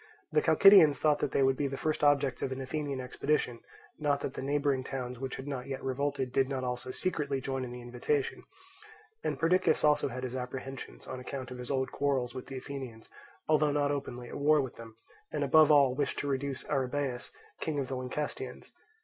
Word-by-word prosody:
The -, -, +3 dB
Chalcidians 185 Hz, -8 st, +7 dB
thought 150 Hz, -1 st, +2 dB
that -, -, 0 dB
they 135 Hz, -, +3 dB
would 135 Hz, 0 st, +4 dB
be 140 Hz, +1 st, 0 dB
the 135 Hz, 0 st, -4 dB
first 155 Hz, +1 st, -1 dB
objects 140 Hz, -3 st, +3 dB
of 135 Hz, -, -1 dB
an 130 Hz, -, -3 dB
Athenian 140 Hz, 0 st, -3 dB
expedition, 125 Hz, -1 st, -1 dB, 0.4 s
not 145 Hz, -2 st, +1 dB
that 130 Hz, -, -3 dB
the -, -, -5 dB
neighbouring 140 Hz, -1 st, +1 dB
towns 125 Hz, -2 st, -5 dB
which 135 Hz, 0 st, -4 dB
had 130 Hz, -, -7 dB
not 130 Hz, -3 st, -4 dB
yet 135 Hz, -1 st, -5 dB
revolted 135 Hz, 0 st, -1 dB
did 135 Hz, 0 st, +2 dB
not 135 Hz, -2 st, -2 dB
also 125 Hz, 0 st, -3 dB
secretly 145 Hz, -2 st, -1 dB
join 135 Hz, 0 st, -3 dB
in 125 Hz, -, -6 dB
the 125 Hz, 0 st, -8 dB
invitation; 125 Hz, +4 st, -1 dB, 0.8 s
and -, -, -1 dB
Perdiccas 180 Hz, +3 st, +3 dB
also 150 Hz, -1 st, +4 dB
had 130 Hz, -1 st, -5 dB
his 130 Hz, 0 st, -4 dB
apprehensions 130 Hz, +1 st, -6 dB
on 130 Hz, -, -5 dB
account 130 Hz, 0 st, -6 dB
of 125 Hz, -, -7 dB
his 125 Hz, -, -7 dB
old 130 Hz, -1 st, 0 dB
quarrels 135 Hz, -4 st, 0 dB
with 130 Hz, -1 st, -7 dB
the 135 Hz, -, -6 dB
Athenians, 130 Hz, -4 st, -7 dB, 0.4 s
although 155 Hz, -1 st, +4 dB
not 145 Hz, 0 st, +1 dB
openly 125 Hz, -4 st, -4 dB
at -, -, -6 dB
war 150 Hz, +1 st, +5 dB
with 130 Hz, -3 st, -3 dB
them, 115 Hz, -1 st, -11 dB, 0.4 s
and 150 Hz, -2 st, -1 dB
above 155 Hz, +2 st, +6 dB
all 140 Hz, -3 st, +6 dB
wished 140 Hz, +2 st, -1 dB
to 145 Hz, -, -2 dB
reduce 140 Hz, -1 st, -2 dB
Arrhabaeus, 135 Hz, -2 st, -1 dB, 0.3 s
king 155 Hz, -2 st, -2 dB
of 135 Hz, -2 st, -1 dB
the 135 Hz, -, -3 dB
Lyncestians. 130 Hz, 0 st, -5 dB
135 Hz, 205 wpm, -31 LUFS, 130-145 Hz, 0.8 s, Chalcidians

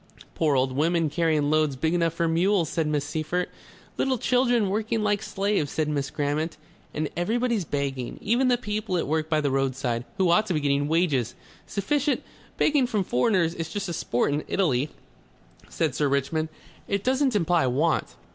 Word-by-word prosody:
"Poor 150 Hz, -3 st, +1 dB
old 130 Hz, 0 st, +2 dB
women 160 Hz, +3 st, +1 dB
carrying 155 Hz, -3 st, +1 dB
loads 155 Hz, -3 st, +2 dB
big 160 Hz, +5 st, 0 dB
enough 165 Hz, -2 st, +1 dB
for 170 Hz, 0 st, 0 dB
mules," 170 Hz, +1 st, +2 dB
said 165 Hz, -3 st, -1 dB
Miss 150 Hz, -2 st, 0 dB
Seyffert. 160 Hz, +4 st, -2 dB, 0.5 s
"Little 265 Hz, -1 st, +1 dB
children 245 Hz, -4 st, +2 dB
working 220 Hz, +1 st, -1 dB
like 205 Hz, -1 st, +1 dB
slaves," 195 Hz, -8 st, -1 dB
said 155 Hz, -1 st, 0 dB
Miss 140 Hz, -2 st, -1 dB
Grammont. 150 Hz, +3 st, -2 dB, 0.3 s
"And 155 Hz, 0 st, -2 dB
everybody 225 Hz, +4 st, 0 dB
begging. 140 Hz, -5 st, -3 dB
Even 240 Hz, +5 st, +2 dB
the 245 Hz, -1 st, +3 dB
people 210 Hz, -4 st, -2 dB
at -, -, 0 dB
work 155 Hz, +1 st, -1 dB
by 155 Hz, -1 st, +2 dB
the 140 Hz, -2 st, 0 dB
roadside. 130 Hz, -3 st, -1 dB
Who 185 Hz, -3 st, +3 dB
ought 215 Hz, +5 st, +3 dB
to 180 Hz, -, 0 dB
be -, -, +2 dB
getting 145 Hz, 0 st, +1 dB
wages 150 Hz, -8 st, +1 dB, 0.3 s
sufficient...." 285 Hz, +9 st, 0 dB, 0.3 s
"Begging 290 Hz, -4 st, +3 dB
from 215 Hz, -5 st, 0 dB
foreigners 170 Hz, -, +2 dB
is 165 Hz, -2 st, -5 dB
just 200 Hz, +2 st, -4 dB
a -, -, -3 dB
sport 125 Hz, -2 st, 0 dB
in 150 Hz, -, -1 dB
Italy," 150 Hz, -7 st, +1 dB, 0.8 s
said 160 Hz, -5 st, -1 dB
Sir 145 Hz, +1 st, +1 dB
Richmond. 140 Hz, +3 st, 0 dB, 0.4 s
"It 200 Hz, 0 st, -1 dB
doesn't 260 Hz, -1 st, +2 dB
imply 170 Hz, -6 st, +2 dB
want. 150 Hz, +6 st, 0 dB
165 Hz, 175 wpm, -26 LUFS, 145-205 Hz, 0.8 s, the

